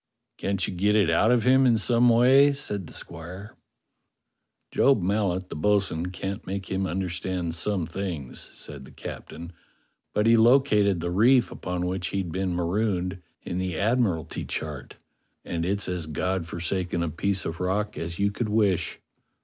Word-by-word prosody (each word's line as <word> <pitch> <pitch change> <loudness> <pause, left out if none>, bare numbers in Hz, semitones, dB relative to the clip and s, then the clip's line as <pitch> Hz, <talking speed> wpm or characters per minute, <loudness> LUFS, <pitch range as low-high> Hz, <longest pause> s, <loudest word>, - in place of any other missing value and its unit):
"Can't 100 -1 -1
you - - -4
get 100 +4 +2
it 100 -6 +4
out 95 +7 +3
of 120 -2 +3
him 130 +1 +5
in 115 -2 +4
some 120 +2 +4
way?" 130 +5 +6
said 105 - -4
the - - -12
squire. 90 +5 -9 1.2
"Job 135 -4 +4
Mallet, 95 -1 0
the - - -6
bo'sun, 95 -1 +1
can't 95 +2 -5
make 95 0 -5
him 95 0 0
understand 90 -1 -3
some 90 +1 0
things," 85 -6 -5
said 70 -2 -8
the - - -14
captain, 85 +2 -8 0.6
"but 105 - +2
he 115 0 +6
located 110 -6 +4
the 85 +1 -2
reef 120 +6 +4
upon 90 0 -3
which 90 0 -2
he'd 95 -4 -3
been 95 0 -1
marooned 90 0 -1 0.2
in 90 - -3
the 90 -3 -2
Admiralty 100 -7 0
chart, - - -5 0.5
and 85 0 -2
it's 100 +1 -1
as 90 -3 -3
God 90 +3 -2
forsaken 85 +1 -2
a 85 - -1
piece 95 +4 -1
of 80 +1 -4
rock 100 +3 -1
as 85 +1 -5
you 100 0 +1
could 110 +1 -3
wish. 105 -4 +1
95 Hz, 165 wpm, -26 LUFS, 85-105 Hz, 1.2 s, way